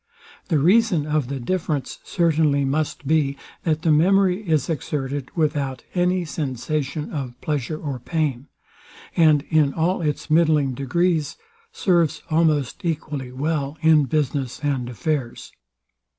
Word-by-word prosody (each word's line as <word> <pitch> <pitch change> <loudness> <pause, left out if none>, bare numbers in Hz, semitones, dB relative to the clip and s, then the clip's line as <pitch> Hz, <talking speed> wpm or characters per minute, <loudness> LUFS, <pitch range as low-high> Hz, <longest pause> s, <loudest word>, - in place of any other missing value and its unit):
The 160 - +2
reason 180 +1 +3
of 150 -3 0
the 135 0 -4
difference 155 0 -2
certainly 155 -5 +2
must 145 +1 -2
be, 140 -2 +1 0.3
that 155 -2 0
the 160 - +3
memory 185 +4 +3
is 155 -4 +2
exerted 140 -4 -3
without 145 -5 -1
any 180 0 +1
sensation 150 0 -3
of 130 -5 -5
pleasure 150 0 -2
or 140 -5 -4
pain; 145 -2 -2 0.7
and 155 -4 +5
in 150 -3 +3
all 175 +3 +1
its 150 -3 -2
middling 155 -4 +3
degrees 155 +4 0 0.3
serves 170 - +1
almost 155 +1 +1
equally 150 -6 -3
well 145 +2 -2
in 155 -2 +5
business 140 -3 -1
and 135 -4 -1
affairs. 135 -1 -3
150 Hz, 125 wpm, -22 LUFS, 140-165 Hz, 0.7 s, and